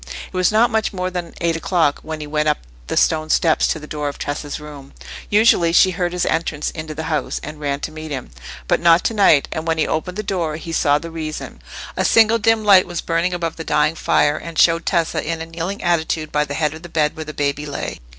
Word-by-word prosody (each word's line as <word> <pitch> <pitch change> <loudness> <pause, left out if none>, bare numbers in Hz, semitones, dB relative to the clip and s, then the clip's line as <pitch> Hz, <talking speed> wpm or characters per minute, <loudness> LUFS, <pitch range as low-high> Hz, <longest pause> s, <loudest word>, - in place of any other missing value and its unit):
It - - -19
was 185 +1 +2
not 230 +3 +3
much 220 -1 0
more 185 -1 -3
than 180 -2 -5
eight 170 -1 +1
o'clock 165 -3 +1
when 155 0 -6
he - - -5
went 150 +1 0
up 150 - +1 0.3
the - - -3
stone 155 -1 +2
steps 160 -1 +3
to - - -1
the 150 - -9
door 150 -1 -3
of 140 - -8
Tessa's 145 0 -4
room. 145 -2 -11 0.4
Usually 205 -5 +4
she 185 +2 +5
heard 175 -1 -2
his 180 0 -1
entrance 155 -2 -1
into 155 -1 -7
the 160 - -4
house, 155 -2 -2
and 150 0 -8
ran 140 -1 -2
to - - -4
meet 155 0 -8
him, 135 - -5 0.4
but - - +2
not 170 0 +5
to - - 0
night; 195 -9 +4
and 160 +1 -4
when 165 0 +1
he 155 - +2
opened 180 +4 -3
the 215 - -2
door 175 -6 -2
he 165 +1 -7
saw 145 -2 +3
the 165 +2 -7
reason. 155 -2 -6 0.3
A - - 0
single 225 0 +4
dim 225 0 +2
light 195 -3 +6
was 175 -2 -4
burning 165 +2 0
above 165 -2 -3
the 165 - -5
dying 155 - +2
fire, 150 -2 +2
and 165 0 -8
showed 165 +1 +3
Tessa 170 -3 0
in 165 0 -3
a 165 - -5
kneeling 170 +4 -5
attitude 160 -2 0
by 150 0 +1
the 145 - -5
head 150 -1 0
of 160 - -10
the 175 - -10
bed 150 -2 0
where 155 - -6
the 155 - -6
baby 145 0 -2
lay. 145 - -5
165 Hz, 245 wpm, -20 LUFS, 150-175 Hz, 0.4 s, light